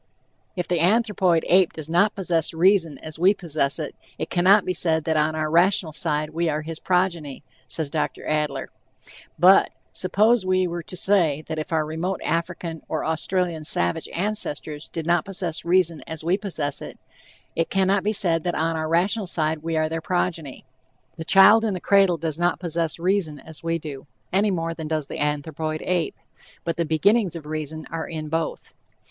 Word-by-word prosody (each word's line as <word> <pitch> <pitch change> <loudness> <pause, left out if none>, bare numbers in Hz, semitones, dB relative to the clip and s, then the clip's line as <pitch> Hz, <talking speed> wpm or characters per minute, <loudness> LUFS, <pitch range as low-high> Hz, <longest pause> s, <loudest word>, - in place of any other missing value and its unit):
"If 180 -2 -3
the 175 -2 0
anthropoid 190 -3 +2
ape 185 -1 +4
does 155 -2 -6
not 175 +6 +2
possess 170 -4 0
reason 170 -4 +3
as 155 0 -6
we 190 +4 +5
possess 155 -7 -2
it, - - -5 0.2
it - - -5
cannot 190 +3 +5
be 185 - 0
said 160 -3 +1
that 160 0 0
on 155 +1 +1
our 155 0 -1
rational 170 +1 +3
side 150 -1 -1
we 165 +1 0
are 150 0 -2
his 160 +1 -6
progeny," 175 -6 -1 0.2
says 150 +1 -4
Dr. 155 - -2
Adler: 150 -1 -2 0.7
But, 185 +4 +6 0.2
suppose 210 +4 +2
we 185 0 +2
were 175 -1 -3
to 180 +3 -9
say 170 -7 +2
that 160 -1 -4
if 155 - -5
our 160 -2 +1
remote 165 +4 -3
African 170 0 -3
or 155 - -2
Australian 165 0 -1
savage 85 - +2
ancestors 165 -6 -3
did 165 -2 -4
not 175 -1 +2
possess 180 -4 -3
reason 170 -2 +2
as 160 -1 -6
we 175 +3 +2
possess 170 -9 -3
it, - - -8 0.6
"it 165 - 0
cannot 195 0 +2
be 210 - +1
said 170 -6 +2
that 175 -1 -1
on 165 +1 0
our 155 0 -2
rational 190 +5 +1
side 160 -2 0
we 165 +1 -2
are 155 0 +2
their 165 +1 -4
progeny," 165 -6 -2 0.5
The 160 - -6
child 195 +5 +7
in 215 -4 0
the - - -4
cradle 195 -2 +3
does 160 0 -3
not 175 -1 +1
possess 170 -2 -1
reason 175 -3 0
"as 155 +2 -9
we 165 0 -1
do," 145 -4 -8 0.3
any 205 +3 +3
more 165 -3 -2
than 160 -2 -6
does 155 -2 -1
the - - -7
anthropoid 155 +1 -2
ape, 180 -2 0 0.5
but 165 -2 -3
the 170 - 0
beginnings 185 +4 +2
of 160 -3 -7
reason 155 0 -5
are 165 -1 -4
in 155 -2 -6
both. 160 0 -3
165 Hz, 190 wpm, -23 LUFS, 155-185 Hz, 0.7 s, child